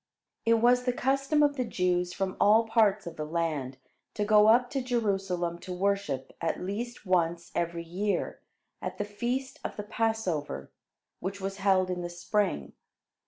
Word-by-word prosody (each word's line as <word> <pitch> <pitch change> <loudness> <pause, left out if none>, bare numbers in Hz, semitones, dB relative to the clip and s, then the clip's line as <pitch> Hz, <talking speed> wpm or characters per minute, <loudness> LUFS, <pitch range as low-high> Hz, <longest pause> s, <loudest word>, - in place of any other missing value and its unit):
It 230 - +6
was 245 +2 +4
the 250 - +2
custom 275 +4 +2
of 290 -1 +2
the 255 - +1
Jews 180 -5 0
from 190 0 -2
all 215 +3 +5
parts 215 -3 +3
of 170 -1 -7
the 155 - -2
land 150 -5 -2 0.4
to 210 - 0
go 210 0 +6
up 240 +3 +5
to 275 - -1
Jerusalem 195 -8 -1
to 185 - -8
worship 180 -8 -1
at 165 - -1
least 215 +6 -5
once 170 -2 +1
every 170 0 -1
year, 195 +5 -2 0.4
at - - -4
the 205 - -2
feast 245 +6 -3
of - - -4
the 210 - -3
Passover, 210 -8 -2 0.5
which 195 +2 -4
was 195 0 -4
held 190 -2 +3
in 180 -1 -2
the 175 - -4
spring. 175 - -1
200 Hz, 165 wpm, -29 LUFS, 175-225 Hz, 0.5 s, It